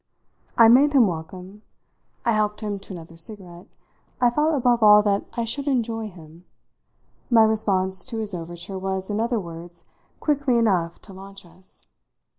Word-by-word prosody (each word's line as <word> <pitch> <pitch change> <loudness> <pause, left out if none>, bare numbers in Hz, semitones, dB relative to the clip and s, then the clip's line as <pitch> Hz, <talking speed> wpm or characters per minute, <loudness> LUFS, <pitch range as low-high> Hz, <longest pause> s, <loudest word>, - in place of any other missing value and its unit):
I 230 - +8
made 275 +6 +5
him 260 -5 +6
welcome, 185 +3 -6 0.6
I 235 - +3
helped 210 -1 0
him 205 -2 -4
to 195 0 -11
another 165 -1 -11
cigarette, 175 -1 -7 0.5
I 245 -1 +3
felt 300 +4 +1
above 245 -3 +2
all 210 -1 +7
that 200 -1 0
I 235 - -2
should 280 +5 -4
enjoy 230 -4 -1
him; 170 -1 -16 0.8
my 230 -3 +6
response 190 -4 0
to 235 -3 -5
his 215 -2 -3
overture 175 +2 -6
was, 190 +1 -4
in 210 +2 -1
other 235 0 0
words, 170 -1 -10 0.3
quickly 285 -5 +1
enough 185 -7 0
to 195 - -12
launch 195 0 -12
us. 175 +2 -12
205 Hz, 160 wpm, -23 LUFS, 180-230 Hz, 0.8 s, I